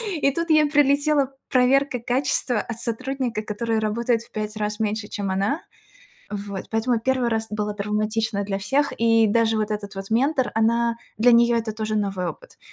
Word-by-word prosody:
и 280 -3 +2
тут 335 +3 -2
ей 310 -1 +5
прилетела 285 -1 +3 0.2
проверка 260 +1 +3
качества 250 -1 0
от 230 0 -5
сотрудника, 250 0 -2
который 220 +1 -2
работает 230 +2 0
в - - -17
5 215 0 -4
раз 210 0 -2
меньше, 215 0 -1
чем 200 -2 -3
она. 200 - 0 0.7
Вот 200 -2 -5
поэтому 225 +2 +1
первый 255 +1 0
раз 225 -1 -1
было 210 0 -2
травматично 210 +1 -1
для 195 -1 -2
всех. 275 +8 0
И 225 -1 +4
даже 225 +1 +2
вот 215 -1 -1
этот 205 -1 -4
вот 195 +1 -7
ментор, 260 +3 +1
она 235 +1 +2 0.2
для 240 +3 +5
нее 235 0 +5
это 225 -1 -2
тоже 215 0 -3
новый 195 -3 -1
опыт. - - -10
225 Hz, 175 wpm, -23 LUFS, 210-255 Hz, 0.7 s, ей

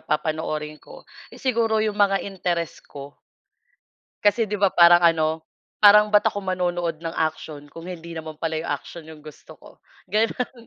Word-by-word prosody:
papanoorin 155 0 -3
ko, - - -15 0.2
eh, - - -15
siguro 230 -4 0
yung 215 - -1
mga 195 -1 +2
interes 175 -4 -3
ko. 140 0 -12 1.1
Kasi 210 +2 +2
'di 210 - -4
ba 200 -2 +4
parang 175 0 +6
ano, 160 -1 +2 0.4
parang 210 +1 +7
ba't 210 - +5
ako 205 - -5
manonood 175 -2 -2
ng 165 -1 -4 0.2
aksiyon 150 -2 -11
kung 165 - -10
hindi 170 -2 -8
naman 160 -1 -8
pala 160 0 -2
'yung 165 - -5
aksiyon 155 +3 -6
'yong 155 -1 -13
gusto 155 -1 -13
ko, - - -16 0.4
gano'n. 230 +2 -1
170 Hz, 165 wpm, -23 LUFS, 155-205 Hz, 1.1 s, parang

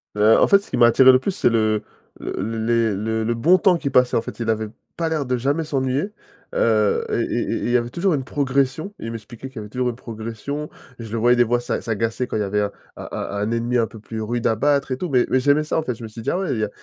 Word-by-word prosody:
Heu, 105 +2 +5
en - - +4
fait, 200 - +6
ce 200 - -15
qui - - -2
m'a 120 -1 +7
attiré 130 +2 +7
le 130 - +4
plus, 195 - -2
c'est 125 - +2
le 110 -2 +1 0.4
l - - -10
le 110 0 -3
les 115 -3 +2
le 110 +2 -1
le 120 +1 0
bon 165 +11 +4
temps 180 -3 +3
qu'il 140 -4 -3
passait. 125 -2 +3
En - - +1
fait, - - -9
il 115 - -2
avait 110 -1 0 0.3
pas 165 -1 0
l'air 155 -4 -1
de 125 0 0
jamais 140 +6 0
s'ennuyer, 140 +6 -1 0.4
heu, 110 -3 +2
et - - 0 0.2
et - - 0
et - - 0
et - - 0
il - - -1
y 125 - +4
avait 120 0 -2
toujours 175 +6 0
une 135 -3 -2
progression 140 +6 -1
et - - -7
il 115 - -4
m'expliquait 115 +3 -9
qu'il 130 - -16
y - - -3
avait 105 -1 -8
toujours 125 +2 -1
une 115 - -5
progression. 115 +6 -6 0.3
Je 115 -2 -7
le 115 - -2
voyais, 120 +2 +4
des 120 - +5
fois, 120 +1 +1
s'a - - -2
s'agacer 115 +2 -2
quand - - -5
il 105 - 0
y - - +1
avait 105 +1 0
un 100 0 -1 0.3
un - - -7
un - - -4
un 105 +2 -1
ennemi 120 +1 0
un 115 -2 +2
peu 110 - -12
plus 110 0 -6
rude 120 +2 -3
à 110 - +2
battre, 140 +1 +1
et 130 - -1
tout. 180 - -3
Mais 125 -3 +3
mais 130 - +3
j'aimais 145 +3 +3
ça, 155 - -1
en - - -2
fait. 125 -5 -3
Je 115 - -11
me 110 - -6
suis 115 +1 -9
dit: - - -2
«Ah 180 - 0
ouais! 190 - -2
Il 110 - -2
y 105 - +1
a - - -7
120 Hz, 315 wpm, -22 LUFS, 110-140 Hz, 0.4 s, m'a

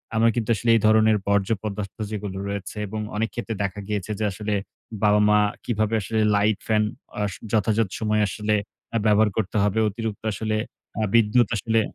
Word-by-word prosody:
আমরা 115 +1 +4
কিন্তু 115 -1 -2
আসলে 115 +2 -2
এই 110 - +3
ধরনের 110 0 +5
বর্জ্য 100 +1 +2
পদার্থ 100 -2 -4 0.2
যেগুলো 100 -2 -4
রয়েছে 100 +1 -5
এবং 110 +2 -5 0.2
অনেক 110 +2 0
ক্ষেত্রে 115 -2 -4
দেখা 100 +1 -3
গিয়েছে 105 0 -3
যে - - -1
আসলে 105 +2 -3 0.5
বাবা-মা 105 0 +5 0.3
কিভাবে 110 -1 0
আসলে 110 +4 -2 0.2
লাইট 105 0 +2
ফ্যান 110 -1 +3 0.4
অ - - 0 0.3
যথাযথ 110 -1 +2
সময়ে 105 -1 +1
আসলে 105 +2 -1 0.5
ব্যবহার 105 0 +4
করতে 110 -1 -2
হবে। 105 +2 +1
অতিরিক্ত 110 0 -5
আসলে 110 +1 -2 0.5
আ - - +2
বিদ্যুৎ 115 0 +4
আসলে 115 +2 +1
105 Hz, 165 wpm, -24 LUFS, 105-110 Hz, 0.5 s, ধরনের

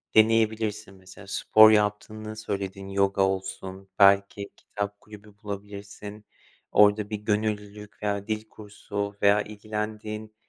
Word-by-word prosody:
deneyebilirsin. 110 -2 +2
Mesela, 95 +1 -14
spor 110 +2 +6
yaptığını 110 +1 -1
söyledin, 100 -2 -5
yoga 100 0 +1
olsun, 95 0 -3
belki 100 0 +4
kitap 100 0 -6
kulübü 105 0 -14
bulabilirsin, 100 +1 -8 0.5
orada 105 0 +4
bir 110 - -2
gönüllülük 105 0 -3
veya 100 -1 -2
dil 110 0 -3
kursu 100 -1 -6
veya 100 +1 +5
ilgilendiğin, 105 +1 -6
105 Hz, 110 wpm, -26 LUFS, 100-110 Hz, 0.5 s, spor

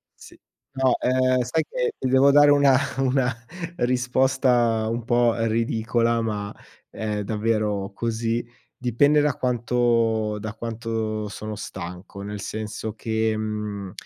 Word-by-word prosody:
Sì. - - -15 0.3
No, 130 -1 +2
ehm, 130 0 +2
sai 125 +7 0
che - - -1
ti - - -1
devo 130 +2 +5
dare 145 +1 +7
una 140 -2 +5 0.2
una 130 -2 +1 0.4
risposta 125 -3 +2
un 115 0 -3
po' 120 -1 +3
ridicola, 115 +1 +1
ma, 105 -2 -3 0.4
è 105 -1 -3
davvero 105 -2 -1
così. 115 +1 -2 0.3
Dipende 140 +5 +3
da 145 -3 +2
quanto 115 -3 +1
da 110 0 -6
quanto 110 -2 -3
sono 105 +1 -6
stanco, 95 0 -8
nel 105 0 -6
senso 110 +1 -5
che, 110 -1 -1
mhmm, 105 -3 -4
115 Hz, 125 wpm, -24 LUFS, 110-125 Hz, 0.4 s, dare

